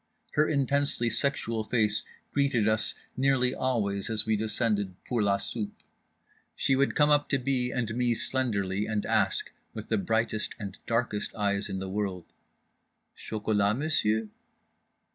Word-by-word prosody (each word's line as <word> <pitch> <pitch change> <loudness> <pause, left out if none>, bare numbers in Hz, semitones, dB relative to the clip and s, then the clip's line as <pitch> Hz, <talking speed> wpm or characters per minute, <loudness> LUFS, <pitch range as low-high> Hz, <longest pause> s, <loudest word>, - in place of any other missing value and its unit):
Her 155 +1 +2
intensely 140 -4 +1
sexual 115 -2 0
face 110 -2 +1 0.3
greeted 135 -6 +2
us 110 0 +1 0.2
nearly 130 -1 +2
always 105 -8 -1
as 110 -1 +2
we 110 0 +2
descended 105 -3 0
pour 120 -3 0
la 100 -1 +3
soupe. 105 +1 -5 0.7
She 135 - +2
would 140 +1 +2
come 150 0 +4
up 145 0 +3
to 135 - +3
B. 125 -1 0
and 115 -3 -2
me 120 -1 +2
slenderly 105 -7 0
and 110 -1 -1
ask, - - +1 0.2
with 110 -1 -7
the 110 - +2
brightest 110 +2 0
and 100 -2 -7
darkest 115 -3 -1
eyes 100 -1 0
in 95 - -3
the 95 0 -4
world, 95 -3 -3 0.9
"_Chocolat, 105 -1 0
M'sieu'? 110 -8 +1
110 Hz, 145 wpm, -28 LUFS, 105-130 Hz, 0.9 s, come